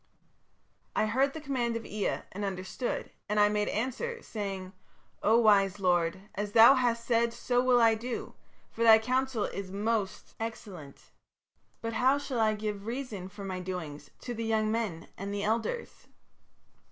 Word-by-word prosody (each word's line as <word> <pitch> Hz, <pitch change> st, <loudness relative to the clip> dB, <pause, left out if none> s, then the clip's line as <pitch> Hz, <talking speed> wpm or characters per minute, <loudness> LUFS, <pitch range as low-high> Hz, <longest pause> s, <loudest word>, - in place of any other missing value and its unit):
"I -, -, +2 dB
heard 265 Hz, +5 st, +1 dB
the 315 Hz, -, -6 dB
command 255 Hz, -5 st, -1 dB
of 230 Hz, -, -4 dB
Ea 210 Hz, 0 st, -2 dB
and 205 Hz, +2 st, -5 dB
understood, 195 Hz, +5 st, -3 dB, 0.2 s
and 210 Hz, 0 st, +1 dB
I 205 Hz, 0 st, +6 dB
made 210 Hz, 0 st, 0 dB
answer, 260 Hz, -, -2 dB
saying, 195 Hz, -3 st, -5 dB, 0.5 s
'O 220 Hz, +2 st, +4 dB
wise 205 Hz, -3 st, +4 dB
lord, 175 Hz, -1 st, +1 dB
as 205 Hz, 0 st, -4 dB
thou 230 Hz, +4 st, +9 dB
hast 240 Hz, -3 st, +1 dB
said 235 Hz, -1 st, +2 dB
so 245 Hz, +1 st, 0 dB
will 250 Hz, -1 st, +4 dB
I 230 Hz, -1 st, +6 dB
do, 235 Hz, +2 st, -5 dB, 0.4 s
for 230 Hz, -, -7 dB
thy 225 Hz, -1 st, +9 dB
counsel 255 Hz, 0 st, 0 dB
is 195 Hz, -1 st, -4 dB
most 205 Hz, 0 st, -2 dB
excellent. 195 Hz, -10 st, -8 dB, 0.7 s
But 230 Hz, 0 st, -3 dB
how 260 Hz, +5 st, +3 dB
shall 280 Hz, -4 st, -3 dB
I 215 Hz, -1 st, +3 dB
give 210 Hz, -1 st, -4 dB
reason 230 Hz, -7 st, -5 dB
for 200 Hz, +1 st, -10 dB
my 185 Hz, -1 st, -4 dB
doings 165 Hz, -6 st, -6 dB
to 245 Hz, -, -5 dB
the 230 Hz, 0 st, -4 dB
young 220 Hz, -1 st, +1 dB
men 210 Hz, -8 st, -2 dB
and 200 Hz, +1 st, -4 dB
the 205 Hz, 0 st, -2 dB
elders?' 230 Hz, -, -2 dB
220 Hz, 165 wpm, -30 LUFS, 200-235 Hz, 0.7 s, thou